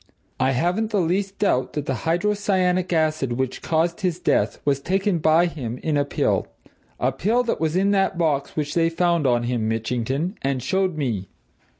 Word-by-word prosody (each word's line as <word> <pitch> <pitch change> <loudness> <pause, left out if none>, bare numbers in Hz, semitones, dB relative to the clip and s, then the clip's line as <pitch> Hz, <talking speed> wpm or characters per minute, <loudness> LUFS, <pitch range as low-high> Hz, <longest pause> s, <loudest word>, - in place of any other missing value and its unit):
I 135 - +2
haven't 180 - 0
the 210 -3 +1
least 195 +3 -1
doubt 130 -11 +1
that 150 -2 -3
the 135 - -1
hydrocyanic 185 - 0
acid 155 -6 +1
which 130 +1 -2
caused 170 +4 0
his 180 -3 0
death - - +1
was 140 -1 +2
taken 190 +4 0
by 160 +3 +4
him 130 -9 -4
in 155 -2 0
a 145 - +3
pill 140 - 0 0.5
a 130 - +1
pill 215 - +1
that 235 - -1
was 160 0 0
in 195 +2 +3
that 195 -2 +1
box 150 -5 0
which 150 -1 -2
they 165 -1 +2
found 170 -3 +1
on 120 -1 +2
him, 120 -2 -1
Mitchington, 125 - -2
and 135 -2 -1
showed 190 -3 0
me. 115 -10 -2
160 Hz, 185 wpm, -23 LUFS, 135-185 Hz, 0.5 s, by